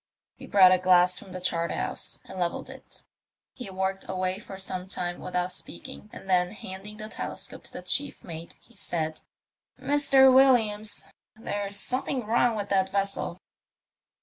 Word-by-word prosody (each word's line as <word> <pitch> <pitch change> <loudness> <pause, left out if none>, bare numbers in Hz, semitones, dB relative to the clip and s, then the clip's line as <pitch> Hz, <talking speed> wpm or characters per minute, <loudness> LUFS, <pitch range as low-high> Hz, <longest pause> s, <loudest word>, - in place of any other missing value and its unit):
He - - -11
brought 190 -2 +7
a 185 - +5
glass 180 0 +4
from 190 - -12
the 185 - -5
obart 170 -2 +1
house - - -3
and 190 - -8
levelled 175 -1 -2
it. - - -11 0.5
He 245 -6 -7
worked 190 0 -2
away 185 0 -1
for 195 -2 -9
some 185 -1 -5
time 175 -2 -2
without 180 0 -2
speaking, 265 -4 -9
and - - -11
then 180 -1 +3
handing 200 +1 -8
the 215 0 -7
telescope - - -6
to - - -9
the - - -8
chief 285 0 -1
mate, 165 -1 -8
he 240 - -24
said, 160 -2 -3 0.6
''Mr. 275 -2 +5
Williams, 220 -6 +4 0.3
there's 205 -2 -2
Bomething 255 +2 -2
wrong 235 +1 +3
with 205 -1 -3
that 190 -1 +2
vessel." 195 -3 -1
195 Hz, 160 wpm, -27 LUFS, 185-220 Hz, 0.6 s, brought